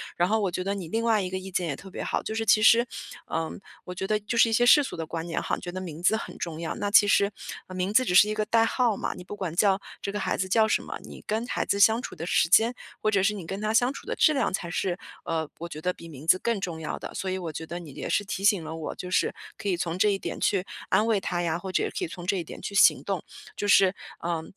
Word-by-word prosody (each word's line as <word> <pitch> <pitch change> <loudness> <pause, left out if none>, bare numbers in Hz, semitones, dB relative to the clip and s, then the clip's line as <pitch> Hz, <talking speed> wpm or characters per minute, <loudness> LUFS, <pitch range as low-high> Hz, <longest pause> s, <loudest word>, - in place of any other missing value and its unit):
然 175 +2 +1
后 220 - +2
我 200 -3 0
觉 180 - -3
得， 195 +2 -1
你 185 -5 -5
另 225 +6 -1
外 220 -3 +3
一 185 - -3
个 185 - -3
意 190 0 -7
见 180 -1 -1
也 145 - -2
特 195 - -12
别 - - -6
好， - - -2
就 220 - -4
是 225 0 -2
其 215 0 +5
实， 235 +2 +6 0.5
嗯， 165 +3 -2 0.2
我 180 - -7
觉 190 +2 -4
得 215 - +2
就 230 +3 -3
是 230 - +6
一 - - -1
些 240 +2 +4
世 295 +4 +8
俗 - - -5
的 165 -1 -4
观 165 +1 -5
念 165 - -2
哈， - - -1
觉 175 - -7
得 185 +1 -5
名 165 -3 -7
字 190 +5 +4
很 220 - -6
重 165 -1 -5
要， 165 - -3
那 205 - -2
其 205 0 +6
实， 200 0 +4 0.5
名 185 +3 -1
字 255 +3 +5
只 180 - 0
是 205 +3 +7
一 - - 0
个 215 0 -1
代 230 0 +3
号 230 -1 +1
嘛， - - -3
你 180 - -9
不 205 - -7
管 180 -5 -4
叫 195 0 +3 0.2
这 200 - -3
个 205 - -2
孩 - - -1
子 190 - -1
叫 220 +3 +4
什 - - +1
么， - - -6
你 - - -11
跟 220 +3 -1
孩 - - -1
子 200 - 0
相 220 +3 +5
处 - - -7
的 165 - -6
时 165 - +2
间， 225 +7 +5 0.3
或 215 - +1
者 195 -2 +3
是 210 +1 +2
你 190 -5 -7
跟 195 +3 -5
他 215 +1 -1
相 245 +3 +3
处 275 - -10
的 - - -3
质 310 - +4
量 275 - +1
才 170 -2 -3
是， 180 0 -1 0.3
呃， 160 -2 -2
我 170 - -5
觉 155 -1 -8
得 180 - 0
比 165 - -12
名 150 0 -11
字 185 - +6
更 230 -1 -1
重 170 -4 -4
要 155 - -4
的。 - - -7
所 190 - -3
以 190 - -1
我 170 -3 -4
觉 160 +2 -6
得 170 +2 -6
你 160 -5 -10
也 - - -5
是 205 - +1
提 195 0 -5
醒 200 -5 +4
了 160 +1 -6
我， 160 -1 -5
就 180 - -7
是 - - +2 0.2
可 205 - -6
以 180 - +2
从 170 0 -2
这 210 +2 +4
一 195 - -1
点 - - -5
去 195 -3 +1 0.3
安 215 - +3
慰 215 -3 +2
他 175 -2 -2
呀， 170 -1 0
或 185 +1 -6
者 - - +1
可 - - -1
以 - - -5
从 175 +1 -9
这 195 0 +1
一 170 - -2
点 - - -10
去 200 - -5
行 195 - +6
动。 - - -3 0.3
就 205 - -2
是， 195 -1 +5 0.2
呃， 170 -1 -2
190 Hz, 330 characters per minute, -27 LUFS, 170-215 Hz, 0.5 s, 世